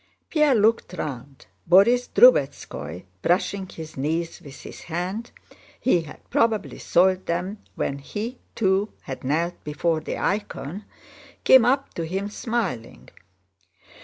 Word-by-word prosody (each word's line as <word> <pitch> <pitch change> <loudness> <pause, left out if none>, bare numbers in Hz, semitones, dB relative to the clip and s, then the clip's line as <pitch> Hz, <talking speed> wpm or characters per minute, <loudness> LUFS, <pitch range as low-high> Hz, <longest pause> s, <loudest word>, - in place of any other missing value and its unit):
Pierre 300 -4 +4
looked 220 -2 +2
round. 140 -5 -6 0.2
Borís 235 +7 +5
Drubetskóy, 135 - +3 0.2
brushing 190 +2 0
his 160 -1 -9
knees 165 +5 -2
with 145 -4 -12
his - - -10
hand 185 +8 -4 0.5
(he 180 -10 +3
had 155 - -13
probably 225 -2 +1
soiled 185 +1 +2
them 180 +5 -2 0.2
when 140 - -2
he, 220 - -5 0.2
too, 195 -1 +1
had 130 - -7
knelt 165 +6 -1
before 155 +2 0
the 155 - -5
icon), 200 -2 -3 0.6
came 260 -3 +7
up 270 +3 +1
to 165 - -3
him 195 +4 -3
smiling. 185 - -3
180 Hz, 125 wpm, -24 LUFS, 155-220 Hz, 0.6 s, came